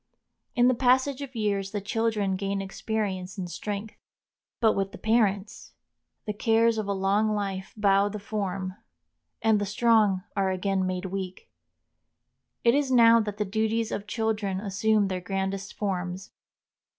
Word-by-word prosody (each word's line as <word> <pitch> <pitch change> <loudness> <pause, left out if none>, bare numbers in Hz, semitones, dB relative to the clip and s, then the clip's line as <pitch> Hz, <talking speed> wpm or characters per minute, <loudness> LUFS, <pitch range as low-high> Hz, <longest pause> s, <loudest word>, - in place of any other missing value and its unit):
In 245 -1 +5
the 255 - +5
passage 260 +2 +2
of 270 -2 -7
years 200 -3 -1
the 205 - -3
children 210 -1 0
gain 195 +1 -2
experience 195 -1 -3
and 185 -2 -3
strength. 205 +4 -5 0.7
But 220 -2 +4
with 195 0 -2
the - - -7
parents! 215 -2 0 0.5
The 210 - -2
cares 225 +1 +2
of 210 - -3
a - - 0
long 200 +2 +1
life 195 -2 -3
bow 200 -1 +3
the 210 - -5
form, 195 -3 -3 0.7
and 220 -2 +3
the - - 0
strong 210 -3 +3
are 195 -2 +1
again 190 0 0
made 185 0 -3
weak. 190 -1 -6 1.1
It 235 -1 +5
is 285 -1 +1
now 230 -2 +7
that 210 -2 -3
the 210 - 0
duties 220 +2 0
of 205 - -4
children 215 -4 -1
assume 205 +1 +1
their 185 -1 -3
grandest 195 +1 -3
forms. 185 -2 -3
205 Hz, 150 wpm, -27 LUFS, 195-220 Hz, 1.1 s, now